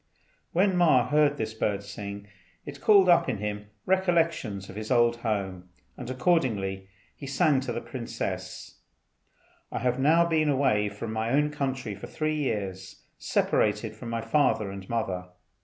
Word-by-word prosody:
When 190 +2 +2
Ma 145 -9 +4
heard 150 -1 +3
this 110 0 -3
bird 100 -2 -1
sing, 100 0 -7 0.4
it 140 -1 -9
called 200 0 +6
up 175 -6 +5
in 120 - -1
him 105 0 -4 0.2
recollections 165 - +1
of 95 - -10
his 110 0 -6
old 120 -1 +3
home, 95 -6 -3 0.3
and 125 -1 -7
accordingly 110 - 0 0.3
he 140 - -9
said 135 0 +2
to 130 -2 -4
the 120 - -3
princess, 120 0 -6 0.9
"I - - -3
have 125 0 0
now 160 +5 +4
been 160 -2 +1
away 120 -7 +2
from 110 +2 -6
my 110 +1 -1
own 150 +4 +2
country 130 -6 -3
for 100 - -9
three 155 0 -2
years, 95 -9 -4 0.2
separated 105 +1 0
from 115 +1 -8
my 115 0 -2
father 115 -8 +1
and 95 -1 -9
mother. 95 -6 -2
120 Hz, 155 wpm, -27 LUFS, 105-145 Hz, 0.9 s, called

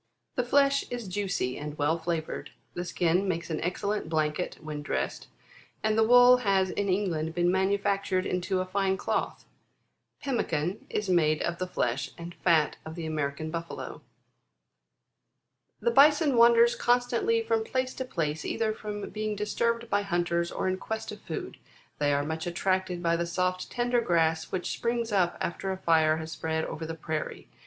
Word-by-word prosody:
17. 250 - +1
The - - -15
flesh 280 0 +4
is 240 -4 -5
juicy, 185 -9 -2
and 150 0 -6
well 150 +2 +2
flavoured. 165 -1 -3 0.2
The 175 - -4
skin 175 +2 +1
makes 170 -2 -2
an 155 - -2
excellent 195 +1 -2
blanket 155 +1 -1
when 155 -2 -6
dressed; 145 - -3 0.6
and 215 0 +2
the 220 - +4
wool 245 +2 +7
has 195 -5 +2
in 205 -1 -1
England 170 -5 0
been 175 0 +3
manufactured 195 0 +1
into 185 +1 -1
a - - -2
fine 190 0 0
cloth. - - -2 0.7
Pemmican 185 - -2
is 210 - -2
made 155 -4 +3
of 170 0 -2
the 185 - -2
flesh 125 -6 -1
and 170 0 -8
fat 165 -4 +2
of 160 0 -8
the 170 -2 -5
American 155 0 -2
Buffalo. 165 0 -5
18. - - -21 1.8
"The 475 - +2
Bison 295 - +5
wanders 235 0 +6
constantly 245 - +2
from 450 0 +1
place 255 -10 -2
to 260 - -4
place, 160 -11 -2
either 220 -1 -1
from 210 -1 -6
being 215 0 -2
disturbed 230 +3 -1
by 205 - +3
hunters, 175 -2 0
or - - -2
in 185 0 0
quest 220 +1 -4
of 210 - -9
food. 160 - -6 0.4
They 145 -1 +2
are 140 0 +1
much 160 +2 -3
attracted 185 0 -1
by 170 0 +2
the 170 0 -1
soft 185 +1 -1
tender 245 0 +1
grass, 165 -5 +1
which 185 -1 -2
springs 235 -1 -1
up 185 -4 +2
after 190 +3 -2
a 190 - -3
fire 160 -3 +3
has 160 0 -6
spread 160 +1 -2
over 160 0 -5
the 165 - -4
prairie. 155 -1 -4
185 Hz, 175 wpm, -28 LUFS, 160-215 Hz, 1.8 s, wool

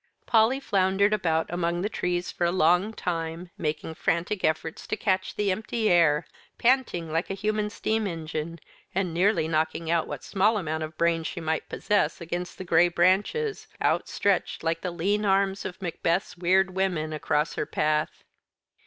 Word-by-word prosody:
Polly 230 +4 +4
floundered 195 -3 +2
about 165 -6 +1
among 175 0 -1
the - - +1
trees 180 -4 -2
for 175 - -1
a 170 - +2
long 180 +4 +3
time, 170 -3 -4
making 155 +1 -3
frantic 175 +5 -1
efforts 155 0 -1
to - - -2
catch 190 -2 0
the 205 -2 +1
empty 220 +2 -1
air, 165 -3 +4 0.3
panting 235 -10 +1
like 165 +3 -1
a 195 - -2
human 210 +1 -1
steam 220 0 -1
engine, 165 -1 -4 0.4
and 185 -3 0
nearly 180 -1 +2
knocking 160 +1 -1
out 170 -1 +1
what 145 -3 -6
small 210 +3 +2
amount 160 -4 -2
of 155 0 -6
brains 165 -1 +1
she 180 - -5
might 160 -1 -2
possess 200 -7 0
against 175 +1 -5
the - - -6
gray 170 0 +5
branches, 195 - +1
outstretched 200 -5 0
like 165 0 0
the 180 - -2
lean 195 +5 0
arms 195 -1 +1
of 180 - -6
Macbeth's 170 +1 -1
weird 185 +2 +2
women 180 -5 -1
across 150 0 0
her - - -3
path. 155 0 -1
175 Hz, 165 wpm, -26 LUFS, 165-195 Hz, 0.4 s, gray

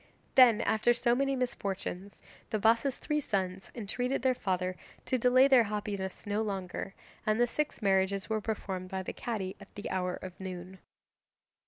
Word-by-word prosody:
Then, 240 -4 +7
after 230 +2 +3
so 235 0 +2
many 275 +2 +1
misfortunes, 200 -6 -3 0.3
the 220 - 0
Bassa's 230 +5 +3
three 300 0 -1
sons 190 -7 -2
entreated 245 +4 -2
their 260 -1 +4
father 185 -5 -1 0.3
to 255 - 0
delay 255 +3 +6
their 260 -4 +6
happiness 200 -2 -4
no 205 +1 0
longer, 195 -2 -4 0.3
and 215 +1 +1
the 240 - +6
six 295 0 -3
marriages 195 0 +2
were 220 -1 -1
performed 190 -4 -4
by 190 -1 -3
the - - -5
Cadi 200 -6 -3
at 200 - -15
the 205 - -5
hour 180 -1 -1
of 185 -1 -9
noon. 185 0 -7
210 Hz, 165 wpm, -31 LUFS, 190-240 Hz, 0.3 s, Then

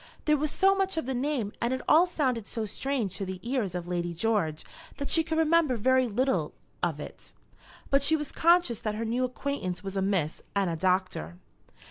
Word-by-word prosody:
There 300 - +4
was 300 +1 0
so 390 +5 +4
much 385 -3 -1
of 320 - -1
the 265 - -2
name 250 -5 -1
and 235 - +1
it 260 - -5
all 335 +4 +6
sounded 255 - -1
so 225 -2 -3
strange 235 -2 -2
to - - -3
the 190 -1 -5
ears 235 -8 -1
of 175 -1 -4
Lady 175 -1 -2
George 170 -6 0 0.3
that 280 - -3
she 325 - +5
could 320 0 -2
remember 320 -5 +3
very 260 +3 +3
little 255 +5 0 0.3
of - - -1
it, - - -10 0.6
but 275 0 +4
she 315 +3 +3
was 300 -2 -3
conscious 335 -9 +3
that 215 -1 -3
her 225 +2 -3
new 240 +3 0
acquaintance 250 -7 -3
was 195 0 -5
a 195 - 0
miss 190 -6 0
and 195 -3 +1
a - - -2
doctor. 180 - -1
245 Hz, 205 wpm, -28 LUFS, 195-295 Hz, 0.6 s, all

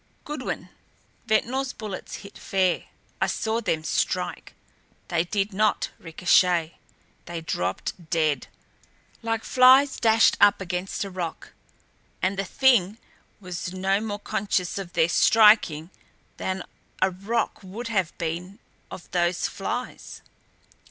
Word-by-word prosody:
"Goodwin 300 +1 -5 0.6
Ventnor's 255 +5 +1
bullets 210 -4 -7
hit 200 - -12
fair. 185 -3 0 0.4
I - - +3
saw 225 +1 -1
them 165 -7 -1
strike. - - -2 0.5
They 170 0 +1
did 200 +2 -1
not 215 +2 +1
ricochet 175 0 +2 0.5
they 170 -1 -5
dropped 155 - -3
dead. 155 -3 +1 0.7
Like 225 -1 -2
flies 260 +2 +5
dashed 225 -1 +4
up 205 - +6
against 185 +1 -3
a 195 - -6
rock 175 -3 -6 0.7
and 190 +2 0
the 195 0 -2
Thing 220 -3 +3 0.4
was 180 -2 -6
no 195 +2 +1
more 210 -2 -3
conscious 195 -3 -1
of 180 -3 -7
their 165 -1 +3
striking 190 -5 +5 0.5
than 190 -1 -3 0.4
a 190 0 +3
rock 210 +5 -2
would 210 +5 -7
have 190 -7 -1
been 175 +4 -4 0.3
of 175 - -10
those 175 0 +1
flies." 245 +5 -5
190 Hz, 120 wpm, -25 LUFS, 175-220 Hz, 0.7 s, up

